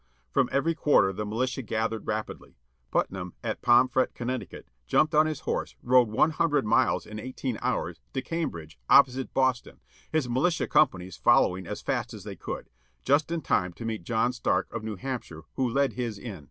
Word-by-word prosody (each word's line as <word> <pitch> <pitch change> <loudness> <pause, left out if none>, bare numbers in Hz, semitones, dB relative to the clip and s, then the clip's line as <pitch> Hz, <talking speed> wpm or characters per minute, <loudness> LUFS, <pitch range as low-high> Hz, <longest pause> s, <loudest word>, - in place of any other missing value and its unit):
From 135 -3 +2
every 160 +5 +1
quarter 145 -11 +3
the 105 +2 -4
militia 125 +5 -1
gathered 115 -1 -2
rapidly. - - -4 0.3
Putnam, 90 -2 -2
at 110 -2 -3
Pomfret, 125 +2 +3
Conn., 125 0 -3 0.4
jumped 155 - +3
on 155 +1 +5
his 155 -3 -4
horse, - - -3
rode 125 -2 +5
one 130 +9 +3
htmdred 155 -3 +1
miles 115 +4 +2
in 105 0 -8
eighteen 130 0 -4
hours, - - -2
to 130 - 0
Cambridge, 85 - -4
opposite 130 -1 +5
Boston, 130 -2 0 0.3
his 155 -5 +1
militia 140 +8 +1
companies 95 - +2
following 95 -8 +3
as - - -5
fast - - -2
as - - -10
they - - -7
could; - - -7 0.3
just 145 +3 +2
in 170 -1 -1
time 90 - 0
to 115 - -8
meet 110 -3 -3
John 115 +5 +1
Stark 95 -6 -1
of 115 -1 -4
New 110 -1 -4
Hampshire, 95 -7 -6
who 130 -2 0
led 140 +3 +1
his 120 -4 -3
in. 100 -4 -7
125 Hz, 180 wpm, -27 LUFS, 110-135 Hz, 0.4 s, on